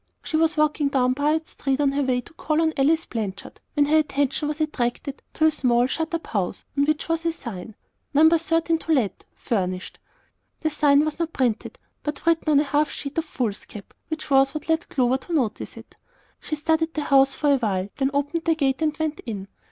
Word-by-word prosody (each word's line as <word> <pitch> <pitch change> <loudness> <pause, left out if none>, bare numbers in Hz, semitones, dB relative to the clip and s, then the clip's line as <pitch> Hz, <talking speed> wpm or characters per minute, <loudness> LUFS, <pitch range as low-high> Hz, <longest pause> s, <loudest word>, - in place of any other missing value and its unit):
She - - -3
was 320 0 +2
walking 300 -1 +2
down 255 -2 +2
Piute 300 +4 +1
Street 270 -2 -2
on 285 -2 +3
her 280 +1 0
way 255 -2 +1
to 320 - -17
call 310 -1 -1
on 320 -1 +2
Alice 315 +4 +2
Blanchard, 205 -4 -5
when 290 -1 +4
her 305 +2 +4
attention 285 -1 0
was 300 +1 -3
attracted 280 -2 -2
to 315 - +3
a 315 - +6
small, 245 -4 +2
shut 320 +5 -2
up 330 - -4
house, 195 -3 -3
on 280 0 +3
which 310 +1 0
was 330 0 -1
a 335 - +1
sign: 220 - -8 0.4
"No. 305 +2 +6
13. 330 0 +2
To 325 - 0
Let, 245 -9 0
Furnished." 185 -6 -3 0.6
The 315 - 0
sign 290 0 +4
was 310 +2 -3
not 330 -1 -2
printed, 245 -4 -1 0.2
but 295 - -5
written 330 -1 +2
on 285 - +6
a - - +3
half 295 +1 +1
sheet 285 +3 -4
of 325 - -3
foolscap, 215 -7 -5
which 315 -2 -5
was 270 +1 +4
what 305 - -5
led 325 +1 0
Clover 255 -1 +2
to 345 - -7
notice 250 -9 -1
it. - - -13 0.5
She 305 - -4
studied 320 +2 0
the 305 - -1
house 275 -1 +4
a 285 -2 +5
while, 200 -5 -1
then 270 -1 +1
opened 290 +4 -1
the 330 -1 +3
gate, 275 -2 0
and 305 -1 0
went 310 -1 -2
in. 200 -4 -5
290 Hz, 210 wpm, -24 LUFS, 260-315 Hz, 0.6 s, a